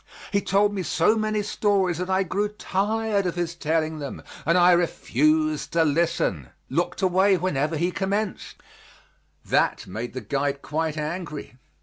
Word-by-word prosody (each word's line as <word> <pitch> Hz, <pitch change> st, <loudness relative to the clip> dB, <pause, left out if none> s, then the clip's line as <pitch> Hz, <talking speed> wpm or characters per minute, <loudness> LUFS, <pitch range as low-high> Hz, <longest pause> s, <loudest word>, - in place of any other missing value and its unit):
He 200 Hz, -, +2 dB
told 200 Hz, +1 st, +2 dB
me 195 Hz, -, -2 dB
so 175 Hz, +4 st, +2 dB
many 215 Hz, -1 st, 0 dB
stories 195 Hz, -4 st, +1 dB
that 180 Hz, +1 st, -3 dB
I 190 Hz, +1 st, +2 dB
grew 200 Hz, +3 st, -1 dB
tired 210 Hz, 0 st, -1 dB
of 180 Hz, -, -2 dB
his 175 Hz, -1 st, -2 dB
telling 160 Hz, -1 st, -1 dB
them 140 Hz, -2 st, -6 dB, 0.2 s
and 170 Hz, +2 st, +4 dB
I 180 Hz, 0 st, +6 dB
refused 155 Hz, -2 st, +1 dB
to 165 Hz, -1 st, +4 dB
listen 145 Hz, -, 0 dB, 0.2 s
looked 175 Hz, +6 st, -1 dB
away 190 Hz, +1 st, +4 dB
whenever 160 Hz, -3 st, -1 dB
he 175 Hz, +4 st, 0 dB
commenced; 200 Hz, +2 st, -2 dB, 0.9 s
that -, -, +1 dB
made 110 Hz, +6 st, -6 dB
the 130 Hz, -, -5 dB
guide 140 Hz, +5 st, -2 dB
quite 155 Hz, 0 st, -2 dB
angry. 150 Hz, -4 st, -5 dB
175 Hz, 150 wpm, -25 LUFS, 155-195 Hz, 0.9 s, I